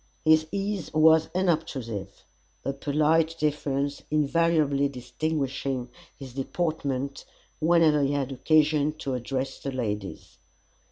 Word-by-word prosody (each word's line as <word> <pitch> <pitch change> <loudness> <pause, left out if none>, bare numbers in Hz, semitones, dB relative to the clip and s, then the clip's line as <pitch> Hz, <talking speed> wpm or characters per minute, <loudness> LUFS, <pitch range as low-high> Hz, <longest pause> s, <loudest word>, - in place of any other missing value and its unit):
His 155 0 +5
ease 200 -3 -3
was 160 0 +5
unobtrusive, 135 - -2 0.4
a 135 - -1
polite 155 +3 +1
deference 145 -2 -1
invariably 150 -2 +2
distinguishing 135 -1 -3 0.3
his 135 -3 -10
deportment 140 -2 -2 0.4
whenever 160 -2 +4
he 140 0 +1
had 140 -2 -1
occasion 150 +2 +2
to 140 -3 -4
address 130 +2 -3
the 140 - -4
ladies. 105 -6 -5
145 Hz, 105 wpm, -26 LUFS, 135-160 Hz, 0.4 s, His